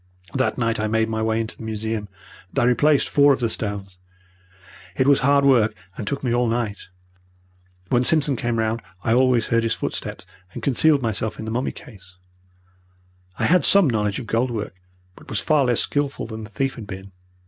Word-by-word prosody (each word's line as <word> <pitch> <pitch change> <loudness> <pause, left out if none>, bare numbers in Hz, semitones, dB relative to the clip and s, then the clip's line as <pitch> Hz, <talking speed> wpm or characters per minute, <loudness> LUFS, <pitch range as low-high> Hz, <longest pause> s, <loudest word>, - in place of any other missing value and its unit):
"That 130 -1 0
night 115 -2 0
I 110 - 0
made 110 +1 +1
my 110 0 -2
way 110 0 0
into 110 -1 -3
the - - -14
museum, 110 -1 -4 0.4
and - - -12
I - - +3
replaced 140 +4 +3
four 145 0 +5
of - - -3
the 120 - +1
stones. 100 -4 -4 1.0
It 130 - +1
was 140 -1 +5
hard 140 +1 +3
work, 120 -6 +4 0.2
and 105 - -6
took 140 +3 -3
me 120 -3 0
all 120 0 +2
night. 115 -4 -3 1.0
When 120 0 +2
Simpson 150 -1 +3
came 120 -2 -2
round 110 +1 -1 0.2
I 110 - +2
always 125 -2 +3
heard 115 0 +2
his 115 -1 0
footsteps, - - -5 0.3
and - - -8
concealed 145 +1 +3
myself 110 -1 -2
in 110 - -6
the 110 - -4
mummy 125 +4 -1
case. 95 -5 -15 1.2
I - - 0
had 180 +2 +4
some 200 -4 +6
knowledge 105 -4 0
of 125 - -6
gold 115 +3 0
work, 110 -6 -4 0.4
but - - -16
was 110 - +1
far 145 +3 +2
less 120 -2 +2
skilful 145 -1 -2
than 110 -1 -7
the - - -13
thief 135 +4 -2
had 110 -4 -9
been. 95 0 -9
115 Hz, 200 wpm, -22 LUFS, 110-135 Hz, 1.2 s, some